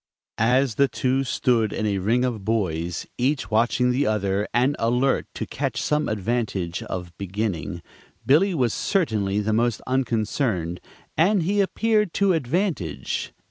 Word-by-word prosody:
As 125 +3 +3
the 140 - +6
two 130 +1 0
stood 120 -4 +1
in 110 - -2
a 100 -2 0
ring 115 +7 +2
of 115 -5 -3
boys, 90 -6 -1
each 130 0 0
watching 120 +3 +2
the 135 +3 +1
other 100 -1 0
and 125 +5 +2
alert 125 +4 +1
to - - -3
catch 135 -4 -3
some 150 0 0
advantage 105 -5 -2
of 90 -2 -6
beginning, 95 -3 -3 0.4
Billy 170 +8 +4
was 125 -6 +1
certainly 105 - 0
the 110 +1 0
most 115 0 +1
unconcerned, 110 - -1 0.3
and 185 +3 +3
he 200 +4 +2
appeared 210 0 +1
to 200 -2 +3
advantage. 160 - -2
120 Hz, 140 wpm, -24 LUFS, 105-140 Hz, 0.4 s, the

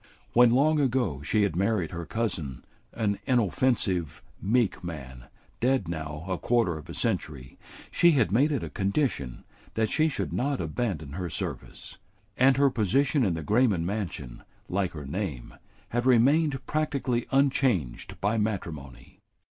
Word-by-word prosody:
When 120 0 +7
long 150 +6 +3
ago 120 - 0
she 105 +9 +1
had 100 -5 0
married 95 -3 0
her 85 -1 -6
cousin, 85 - -3 0.3
an 100 -3 -1
inoffensive, 110 - +1 0.2
meek 115 -1 +1
man, 65 -7 -7 0.3
dead 125 -6 +1
now 80 -1 -5
a 95 -2 -2
quarter 115 -8 +1
of 75 - -10
a - - -6
century, 65 -4 -3 0.3
she 170 -1 +5
had 125 -9 +2
made 135 +9 +3
it 140 - -1
a - - -5
condition 100 - -1 0.3
that 110 -1 +1
she 155 0 +3
should 145 - -3
not 140 +1 0
abandon 80 - -3
her 90 +3 -4
service; - - -5 0.4
and 130 +1 +4
her 140 -1 +4
position 130 - +2
in 95 -6 +1
the 80 - -5
Grayman 105 - +2
mansion, 85 - -4 0.3
like 95 -1 -1
her 75 -3 -7
name, 75 -5 -4 0.4
had 120 +2 -1
remained 135 +2 +3
practically 140 -5 -1
unchanged 135 - +1
by 105 +3 +1
matrimony. 85 - -5
105 Hz, 145 wpm, -27 LUFS, 80-130 Hz, 0.4 s, When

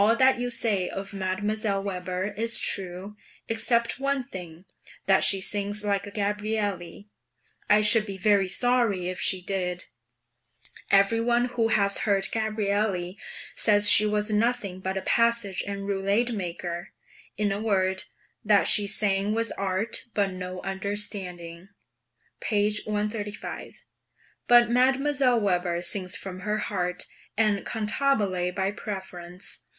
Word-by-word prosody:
All 225 +3 +4
that 260 0 +3
you 245 0 -2
say 215 -6 +1
of 195 +1 -6
Mdlle. 200 +1 -2
Weber 185 +1 -4
is 230 +2 +1
true, 190 +2 0 0.3
except 235 +2 +2
one 275 -1 -1
thing: 180 -5 -10 0.4
that 195 0 +3
she 195 - +5
sings 205 +2 0
like 200 -1 -1
a - - -6
Gabrielli; 205 -3 -3 0.6
I 210 +1 +5
should 215 +1 +4
be 195 -1 -6
very 200 0 +2
sorry 215 -3 +1
if 185 - -5
she 185 -2 0
did. 180 -2 -3 1.0
Every 200 +3 +4
one 240 +1 +2
who 230 -2 +1
has 200 -3 +2
heard 195 -2 0
Gabrielli 205 -4 -1 0.3
says 205 -1 +5
she 215 - +6
was 210 +1 0
nothing 210 -3 0
but 190 +1 -3
a 190 - -4
passage 230 -5 +1
and 200 0 -5
roulade 200 +5 0
maker; 175 -3 -5 0.4
in 205 -1 0
a 200 +1 -3
word, 190 -3 0 0.4
that 210 -1 +4
she 205 -1 +6
sang 200 0 +1
with 230 -1 -1
art, 195 +3 -1
but 200 -2 +1
no 185 0 -6
understanding 190 -3 -3 0.7
(p. 210 0 0
135). 210 0 -5 0.6
But 240 -1 +6
Mdlle. 260 +1 +2
Weber 180 -4 -1
sings 185 +1 -1
from 185 -1 -6
her 210 +3 -2
heart, 180 -4 -2 0.3
and 210 -2 +1
cantabile 210 -5 0
by 195 0 0
preference. 185 -3 -7
205 Hz, 135 wpm, -26 LUFS, 190-220 Hz, 1.0 s, she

